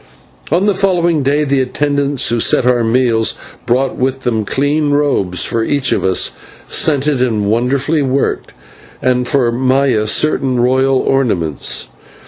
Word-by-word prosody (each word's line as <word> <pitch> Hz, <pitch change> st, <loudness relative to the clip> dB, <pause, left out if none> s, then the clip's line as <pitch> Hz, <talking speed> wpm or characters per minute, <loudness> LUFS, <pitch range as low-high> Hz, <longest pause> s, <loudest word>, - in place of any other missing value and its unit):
On 175 Hz, +5 st, +2 dB
the 205 Hz, -, +2 dB
following 175 Hz, -5 st, +1 dB
day 145 Hz, +3 st, +1 dB
the 140 Hz, -2 st, +1 dB
attendants 140 Hz, +1 st, 0 dB
who 120 Hz, 0 st, 0 dB
set 120 Hz, -, +2 dB
our 125 Hz, -2 st, +2 dB
meals 115 Hz, -1 st, +1 dB, 0.3 s
brought 130 Hz, +2 st, 0 dB
with 130 Hz, +1 st, -2 dB
them 110 Hz, -4 st, -1 dB
clean 145 Hz, +5 st, 0 dB
robes 140 Hz, -, 0 dB
for 115 Hz, -, -1 dB
each 135 Hz, 0 st, -1 dB
of -, -, 0 dB
us, 95 Hz, -1 st, +1 dB, 0.4 s
scented 145 Hz, -3 st, +1 dB
and 110 Hz, -5 st, 0 dB
wonderfully 130 Hz, +8 st, 0 dB
worked, 135 Hz, 0 st, -1 dB, 0.5 s
and 125 Hz, -1 st, 0 dB
for 125 Hz, -3 st, +1 dB
Maya 130 Hz, -2 st, +1 dB
certain 130 Hz, 0 st, +1 dB
royal 130 Hz, +2 st, +2 dB
ornaments. 95 Hz, -, -1 dB
130 Hz, 140 wpm, -14 LUFS, 120-145 Hz, 0.5 s, On